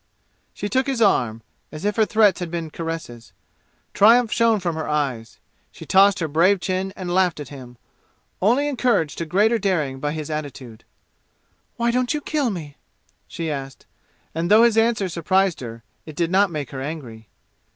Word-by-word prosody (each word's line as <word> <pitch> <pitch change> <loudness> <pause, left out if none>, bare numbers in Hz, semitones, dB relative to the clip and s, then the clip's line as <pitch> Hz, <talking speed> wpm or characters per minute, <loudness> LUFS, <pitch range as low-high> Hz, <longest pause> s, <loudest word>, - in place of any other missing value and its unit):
She 205 - -5
took 260 +5 0
his 270 -3 -1
arm, 120 - +2 0.3
as 155 +5 -7
if 210 - 0
her 220 -2 +2
threats 215 -2 +3
had 175 -2 -4
been 165 -2 -5
caresses. 160 -9 -7 0.6
Triumph 230 +2 +5
shone 230 -2 +3
from 175 -3 -2
her 160 -1 -4
eyes. 135 -7 -2 0.3
She - - -12
tossed 200 +1 +5
her 165 - -2
brave 175 +6 +3
chin 185 +1 -2
and 180 -2 -4
laughed 180 -3 +2
at 145 - -7
him, 125 -4 -11 0.6
only 245 +9 +3
encouraged 240 - 0
to 170 - -3
greater 215 +7 +2
daring 155 -10 -1
by 145 +2 -2
his 155 0 -5
attitude. 135 -7 -7 0.9
"Why 235 0 +1
don't 250 +3 0
you 300 - -3
kill 290 -4 -1
me?" 155 -8 -7 0.5
she 165 -2 -4
asked, 135 -2 -7 0.5
and 165 +2 -2
though 215 +2 +7
his 235 -2 +4
answer 225 -3 +2
surprised 185 +2 +1
her, 115 -2 -8 0.2
it 155 - -9
did 170 +1 -1
not 195 +1 +4
make 150 -5 -5
her 135 -2 -6
angry. 125 - -7
175 Hz, 175 wpm, -22 LUFS, 145-210 Hz, 0.9 s, though